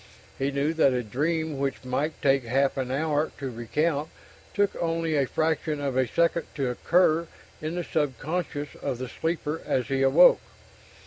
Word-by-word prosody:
He 135 +1 +1
knew 140 +3 0
that 150 -5 +4
a 125 -1 -1
dream 155 +6 -1
which 135 -1 -2
might 145 +5 -2
take 135 -1 +3
half 135 +4 +1
an 130 -2 -2
hour 150 +3 0
to 135 -2 -4
recount 145 +6 -1 0.5
took 200 -1 +2
only 165 -1 0
a 140 -2 +2
fraction 155 0 -1
of 140 -2 -2
a 130 -1 +2
second 170 +4 +1
to 135 -4 -1
occur 170 +4 +2 0.3
in 155 +2 -3
the 175 - -2
sub 145 -6 -1
conscious 150 -1 -3
of 135 -4 -2
the 130 +1 -5
sleeper 160 +2 -3
as 125 0 -1
he 135 -1 0
awoke. 135 +7 +6
145 Hz, 175 wpm, -26 LUFS, 135-160 Hz, 0.5 s, awoke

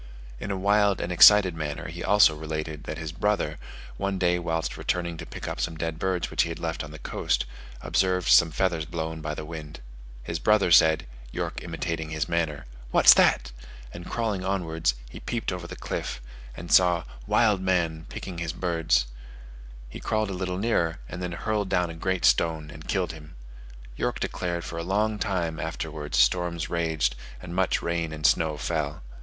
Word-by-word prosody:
In 100 - -5
a 100 - -1
wild 100 +1 +3
and 90 - -3
excited 95 +1 +8
manner 75 -2 -4
he 85 +2 -7
also 100 -5 +5
related, 75 -1 -5
that 75 - -5
his 80 -2 -5
brother, 105 +5 -1 0.4
one 100 -1 -1
day 90 -1 +2
whilst 80 -1 -2
returning 85 -1 -2
to - - -8
pick - - -7
up - - -4
some 80 -1 -2
dead 80 0 -3
birds 95 -2 -1
which - - +2
he - - 0
had 85 - -5
left 80 -1 -3
on 75 - -8
the 80 - -9
coast, - - -1 0.4
observed 90 -1 +1
some 85 - +7
feathers 85 -1 0
blown 80 0 -4
by 75 0 -3
the 75 - -6
wind. 75 -2 -8 0.4
His 85 +5 -4
brother 105 -1 +3
said 80 -1 +6 0.3
(York - - -4
imitating 80 -1 -4
his 75 -2 -2
manner), 85 -4 -1 0.2
"What - - +2
that?" 60 0 +3 0.4
and 85 0 -8
crawling 110 -5 -1
onwards, 80 -8 0
he - - -10
peeped 115 -4 -3
over 90 -2 -5
the - - -8
cliff, - - -4 0.4
and 85 +2 -7
saw 90 -2 +5 0.2
"wild 105 -5 +3
man" 85 -4 0
picking 90 -3 -6
his 85 -2 -3
birds; 85 -8 +1 0.8
he - - -9
crawled 110 -2 -1
a - - -3
little 90 0 -3
nearer, 95 -6 +1
and 90 - -7
then 90 -1 -3
hurled 105 +2 -2
down 90 -3 +1
a - - -7
great 95 +2 -1
stone 80 -2 +2
and 75 - -11
killed 95 -4 0
him. 75 -3 -12 0.6
York - - -2
declared 85 -1 -3
for 85 - -5
a - - -3
long 105 +4 0
time 85 -6 -1
afterwards 80 -2 -4
storms 85 -2 +2
raged, 80 -6 0 0.2
and 85 -1 -8
much 95 -1 +1
rain 85 -1 -1
and 75 -1 -5
snow 80 -2 +3
fell. 75 -3 -2
85 Hz, 185 wpm, -26 LUFS, 80-95 Hz, 0.8 s, excited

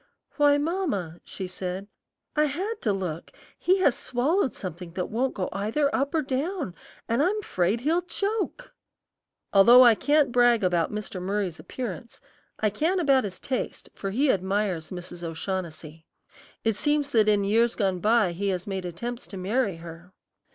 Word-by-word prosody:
"Why, 290 -1 +5
mamma," 290 - -2
she 190 - -6
said, 185 +1 -5 0.5
"I 300 0 +4
had 385 +10 -3
to 215 - +1
look; 180 -5 -4 0.3
he 375 +2 +3
has 285 -9 +4
swallowed 270 +6 0
something 175 -2 -7
that 180 0 -3
won't 255 +4 0
go 185 -3 -2
either 225 +9 0
up 280 +4 0
or 315 - +2
down, 280 - -2 0.3
and 230 +4 +1
I'm 410 +6 +1
'fraid 185 - 0
he'll 325 +6 +2
choke." 415 +7 -3 0.8
Although 235 +6 +8
I 235 - +8
can't 290 +3 +2
brag 240 -3 +4
about 175 -2 +1
Mr. 210 -3 -5
Murry's 190 -2 -2
appearance, 235 -3 -6 0.4
I 215 -1 +1
can 325 - +1
about 275 -7 +3
his 185 -2 -6
taste, 260 -2 -4
for 195 - -4
he 260 +7 +3
admires 190 -3 -1
Mrs. 180 -1 -8
O'Shaughnessy. 165 -2 -5 0.6
It 225 -2 +1
seems 290 +5 +1
that 215 -4 +4
in 205 -1 +3
years 225 +4 +2
gone 190 -4 0
by 215 -2 +3
he 195 +4 -3
has 185 -2 -1
made 190 -2 -4
attempts 235 +8 -5
to 195 - -8
marry 200 +2 0
her. 165 +2 -11
215 Hz, 165 wpm, -26 LUFS, 185-280 Hz, 0.8 s, Although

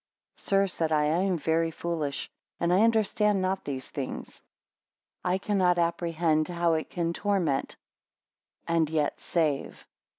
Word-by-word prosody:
3 - - -16
Sir, 195 0 +3
said 165 -4 -2
I, 150 -1 +3
I 150 +2 +2
am 190 -1 +1
very 165 +2 +1
foolish, 160 -4 -3 0.3
and 170 0 +1
understand 210 0 +3
not 190 +1 -1
these 130 -2 -4
things. - - -6 0.8
I 180 +1 +1
cannot 190 -3 +2
apprehend 170 -2 +1
how 170 -1 +1
it 160 -1 -2
can 170 -1 -1
torment, 180 -9 0 0.9
and 165 -2 +2
yet 155 -2 0
save. 155 -5 -1
170 Hz, 135 wpm, -28 LUFS, 160-185 Hz, 0.9 s, Sir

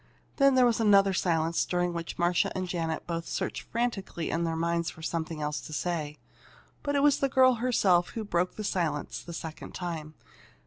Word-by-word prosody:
Then 275 -2 +5
there 255 -1 +6
was 235 -2 +2
another 200 -3 +5
silence 165 -2 +1
during 175 -1 0
which 170 -1 -5
Marcia 175 0 +2
and 185 0 -2
Janet 165 -2 -2
both 165 -1 -4
searched - - -3
frantically 220 -8 -3
in 170 +1 0
their 165 -1 -1
minds 170 0 0
for 160 - -11
something 160 -1 -3
else 150 0 -2
to 155 - -9
say. 155 -3 -2 0.6
But 285 -1 -1
it 280 - +3
was 290 -2 +4
the 275 - +1
girl 260 -1 +5
herself 190 -8 +3
who 225 - -5
broke 180 -3 0
the 215 - -5
silence 165 -7 -2
the 170 - -9
second 160 -1 -7
time. 160 -4 -5
175 Hz, 190 wpm, -29 LUFS, 165-210 Hz, 0.6 s, there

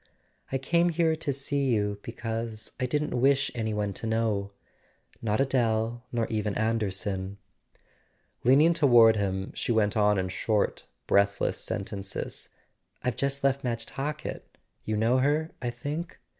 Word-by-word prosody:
"I 135 - +1
came 170 +6 +2
here 165 -1 +2
to 150 -2 -2
see 140 +1 -1
you 105 -4 0
because 115 -1 -5
I 130 - 0
didn't 150 +3 -1
wish 135 +1 +3
any 110 -2 -2
one 105 -1 -1
to 115 - -5
know; 110 -3 0 0.7
not 110 0 0
Adele, 120 -3 +1
nor 115 -2 0
even 105 -2 -2
Anderson." 100 -3 -1 1.1
Leaning 145 +7 +6
toward 120 -8 +6
him 95 -1 -2
she - - -2
went 105 -2 +2
on 105 -1 +4
in 95 -1 -1
short 105 +2 0 0.2
breathless 100 +2 +2
sentences: 100 -1 -4 0.5
"I've 125 -2 0
just 140 0 -1
left 140 0 +2
Madge 115 -2 -2
Talkett: 150 +2 -5 0.3
you 110 0 -1
know 115 +4 +3
her, 150 +4 +1
I 120 - -1
think 145 +8 -5
115 Hz, 145 wpm, -28 LUFS, 105-135 Hz, 1.1 s, Leaning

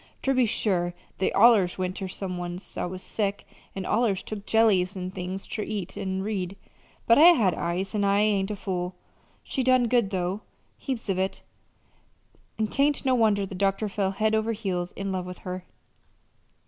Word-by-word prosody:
Ter 270 - +2
be 255 -2 +3
sure, 175 -5 0 0.2
they 190 - +1
allers 205 -5 +5
went 185 0 -2
ter 190 - -4
some 185 -1 -5
one's 175 +2 -6
that - - -3
was 185 +1 -7
sick, 205 -2 -2 0.3
an' 190 -1 -4
allers 215 -4 +1
took 210 -1 -7
jellies 200 -4 +3
an' 185 0 -4
things 185 +1 -5
ter 215 - -4
eat 205 -4 -4
an' 190 -1 -2
read, 195 -2 -3 0.5
but 230 +4 +6
I 345 +3 +9
had 205 - +2
eyes, 180 +4 -2
an' 210 -1 0
I 200 0 +3
ain't 205 -2 +2
a 210 - -2
fool. 180 -2 -3 0.5
She 265 - -2
done 255 -1 +4
good, 235 -4 +2
though 185 +2 -2 0.4
heaps 255 -5 -4
of 190 -2 0
it; 190 +1 -2 1.1
an' 220 - +1
'tain't 280 +7 +1
no 260 - +3
wonder 215 -4 +3
the 195 - -9
doctor 195 +2 0
fell 200 -1 -1
head 215 +3 0
over 220 +1 +1
heels 185 -5 -3
in 195 0 -4
love 185 -1 -3
with 180 -1 -7
her.... 180 0 -5
195 Hz, 185 wpm, -26 LUFS, 185-220 Hz, 1.1 s, I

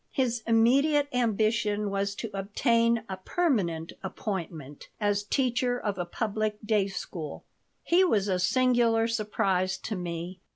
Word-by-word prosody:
His 245 -4 0
immediate 275 +6 +4
ambition 215 -3 +1
was 200 0 -1
to 225 0 -5
obtain 230 +3 +1
a 190 - -5
"permanent 185 - -1
appointment" 170 -7 -5
as 205 -1 +1
teacher 245 +2 0
of 205 -5 -3
a 175 - -1
public 215 +3 -2
day 210 -3 +2
school 170 -5 -6 0.4
He 355 +2 +4
was 210 - +2
a 185 -2 +1
singular 235 +2 +3
surprise 195 -4 0
to 215 +3 -5
me. 175 0 -5
210 Hz, 130 wpm, -28 LUFS, 190-235 Hz, 0.4 s, immediate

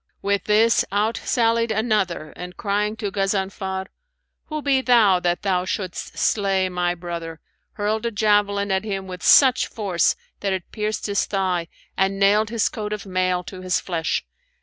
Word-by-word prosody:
With 200 0 0
this 220 +2 +4
out 215 +3 +1
sallied 230 -2 +2
another 210 -8 -1
and 180 0 -8
crying 210 +1 -1
to 210 -3 -4
Ghazanfar, 190 -1 -2 0.6
'Who 305 -1 -5
be 270 -2 +2
thou 225 -8 +5
that 175 0 -1
thou 185 -3 +1
shouldst 185 -1 -5
slay 195 -3 +1
my 175 -1 -1
brother?'; 170 -2 -6 0.3
hurled 215 +2 -1
a - - -2
javelin 205 -1 +2
at 190 +1 +1
him 195 -3 -4
with 180 -1 -8
such 260 -3 +6
force 195 -6 0 0.2
that 195 -1 -1
it 185 -2 -5
pierced 215 0 -3
his 200 -1 0
thigh 185 -4 -1 0.3
and 195 0 +1
nailed 210 +2 +4
his 230 -2 +1
coat 210 -1 -4
of 210 -1 -6
mail 185 -1 0
to 185 0 -9
his 185 -1 0
flesh. 165 -3 -2
200 Hz, 165 wpm, -22 LUFS, 185-215 Hz, 0.6 s, such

